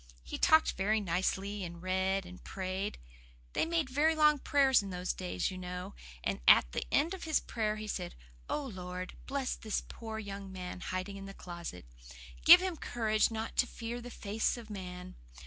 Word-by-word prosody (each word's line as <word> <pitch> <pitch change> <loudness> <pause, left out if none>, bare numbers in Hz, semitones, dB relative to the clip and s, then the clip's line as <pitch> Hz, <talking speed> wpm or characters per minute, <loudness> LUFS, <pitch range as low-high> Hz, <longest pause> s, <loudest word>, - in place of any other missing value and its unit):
He 65 - -6
talked 315 0 +6
very 210 +4 +1
nicely, 195 +2 -1
and 170 -1 -6
read, 190 +1 0
and 180 +1 -11
prayed. 190 +1 -3 0.6
They - - +1
made 330 -3 +1
very 295 +5 +3
long 300 -1 +5
prayers 270 -3 +4
in 200 - -6
those 180 0 -2
days, 185 +1 -2
you 185 - -6
know; 180 0 -5 0.3
and - - -1
at - - +7
the - - -2
end 320 +6 +3
of 375 - -6
his 315 -1 +3
prayer 215 -2 -1
he 215 0 -6
said, - - -4 0.3
'Oh 295 - -1
Lord, 185 -5 -6
bless 270 -1 -1
the 215 -2 -2
poor 220 -1 -6
young 200 -2 -6
man 180 -1 -6
hiding 185 +2 -4
in 195 0 -8
the 195 - -9
closet. 170 - -7 0.6
Give 350 +2 +11
him 370 -3 -2
courage 215 -5 +1
not 225 0 -4
to 250 - +4
fear 235 +1 -5
the 245 - -8
face 220 +1 -1
of 225 -2 -9
man. 180 -2 -7
200 Hz, 185 wpm, -33 LUFS, 185-245 Hz, 0.6 s, Give